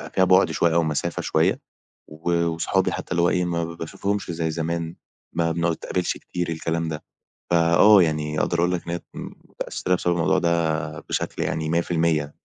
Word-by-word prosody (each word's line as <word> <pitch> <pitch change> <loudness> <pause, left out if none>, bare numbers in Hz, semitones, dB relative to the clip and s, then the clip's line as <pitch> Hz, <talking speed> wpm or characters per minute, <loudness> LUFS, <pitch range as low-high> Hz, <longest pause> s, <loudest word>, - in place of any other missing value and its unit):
فيها 95 - +4
بُعد 95 +1 +4
شوية 85 -1 +2
أو 85 - +4
مسافة 75 -2 -2
شوية. - - +1 0.5
و 85 +2 -1
وصُحابي 80 0 0
حتى - - -6
اللي 85 - +2
هو 85 - +4
إيه، 90 0 +1
ما 85 -1 -1
باشوفهُمِش 85 +4 -3
زي 80 -1 -2
زمان، 85 +1 -3 0.4
ما 85 0 +1
بنتقابَلِش 85 +2 -1
كتير، 90 -1 -4
الكلام 80 0 -2
ده. 75 -1 -5 0.5
فآه، 85 +5 +6
يعني 75 -2 0
أقدَر 85 - 0
أقول 90 +1 +2
لك 90 -1 -3
إن - - -1
هي 85 - -3 0.5
متأثِّرة 90 - -2
بسبَب 90 -1 0
الموضوع 80 -3 +2
ده 85 -2 0
بشكل - - -3
يعني 80 -1 -2
100%. 80 -3 0
85 Hz, 170 wpm, -23 LUFS, 80-85 Hz, 0.5 s, فآه